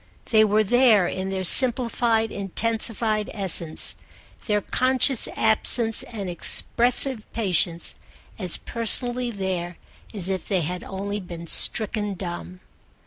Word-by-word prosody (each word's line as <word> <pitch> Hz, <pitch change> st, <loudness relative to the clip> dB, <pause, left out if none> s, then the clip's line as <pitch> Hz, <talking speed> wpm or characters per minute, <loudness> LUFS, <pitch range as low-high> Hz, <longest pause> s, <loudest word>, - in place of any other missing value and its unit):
They 220 Hz, -1 st, +5 dB
were 215 Hz, 0 st, +1 dB
there 230 Hz, -3 st, +3 dB
in 190 Hz, +1 st, -5 dB
their 190 Hz, -1 st, -4 dB
simplified 235 Hz, 0 st, +3 dB
intensified 215 Hz, +1 st, -2 dB
essence, 175 Hz, -5 st, +4 dB, 0.5 s
their 210 Hz, -2 st, +1 dB
conscious 255 Hz, +2 st, +2 dB
absence 225 Hz, +1 st, +1 dB
and 205 Hz, -5 st, -8 dB
expressive 240 Hz, +6 st, 0 dB
patience, 180 Hz, -5 st, -2 dB, 0.4 s
as 185 Hz, -4 st, +1 dB
personally 245 Hz, +2 st, 0 dB
there 185 Hz, -5 st, -5 dB, 0.3 s
as 195 Hz, -5 st, -2 dB
if 190 Hz, -2 st, -4 dB
they 190 Hz, -3 st, -1 dB
had 180 Hz, +3 st, -5 dB
only 200 Hz, +1 st, -6 dB
been 170 Hz, -3 st, -10 dB
stricken 210 Hz, +3 st, 0 dB
dumb. 180 Hz, 0 st, -8 dB
210 Hz, 115 wpm, -22 LUFS, 185-230 Hz, 0.5 s, They